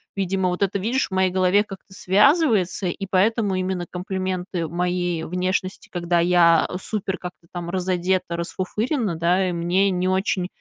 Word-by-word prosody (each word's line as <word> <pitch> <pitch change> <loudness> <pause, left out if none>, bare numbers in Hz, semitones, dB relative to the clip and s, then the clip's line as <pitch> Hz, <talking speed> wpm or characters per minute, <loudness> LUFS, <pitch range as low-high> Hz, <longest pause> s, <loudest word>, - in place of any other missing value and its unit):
видимо, 190 -1 0
вот 180 +2 -1
это, 200 0 0
видишь, 235 +7 0
в - - -47
моей 190 0 +2
голове 185 +2 +3
как-то 195 -1 -11
связывается, 205 - +3
и 195 +3 -3
поэтому 205 +2 +2
именно 185 -1 -2
комплименты 185 -1 -3
моей 175 0 -1
внешности, 185 +2 -2
когда 175 -1 0
я 170 -1 +4
супер 195 -3 -3
как-то 175 -1 -9
там 175 -1 -5
разодета, 185 -1 -1
расфуфырена, 210 - -2
да, 180 +3 +1
мне 180 +4 +1
не 180 0 0
очень, 185 -1 0
185 Hz, 145 wpm, -23 LUFS, 180-195 Hz, -, я